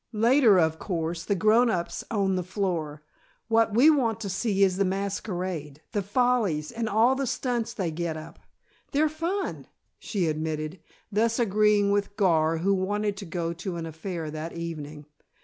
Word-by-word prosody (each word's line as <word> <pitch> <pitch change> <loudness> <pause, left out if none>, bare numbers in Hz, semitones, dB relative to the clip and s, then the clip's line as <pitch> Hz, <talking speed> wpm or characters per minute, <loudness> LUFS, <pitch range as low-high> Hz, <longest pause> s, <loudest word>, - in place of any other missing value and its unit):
Later, 230 -2 +5
of 160 -1 +1
course, 170 -2 -3
the 200 - +1
grown 220 +5 +4
ups 175 -5 -2
own 200 -3 +1
the 185 - 0
floor. 175 -5 -3 0.5
What 225 -1 +3
we 280 +7 +7
want 235 -7 +1
to 200 - -3
see 195 +1 +1
is 185 -2 +2
the 200 - +3
masquerade, 185 -6 -3
the 205 - 0
follies, 205 -7 +1
and 230 -1 -3
all 225 +5 +4
the 270 0 -2
stunts 235 -2 -2
they 180 -5 -2
get 165 0 -3
up. 155 - -10 0.5
They're 300 +3 +3
fun!" 335 +6 -3 0.3
she 195 -5 -2
admitted, 155 +1 -3 0.3
thus 225 +2 +1
agreeing 210 -2 +3
with 200 0 0
Gar, 165 -5 +3
who 190 +5 +1
wanted 205 +2 -1
to 195 - -7
go 170 -1 -3
to 175 +2 -5
an 165 -1 -4
affair 160 0 -5
that 155 +2 -5
evening. 155 -3 -6
195 Hz, 165 wpm, -26 LUFS, 165-220 Hz, 0.5 s, we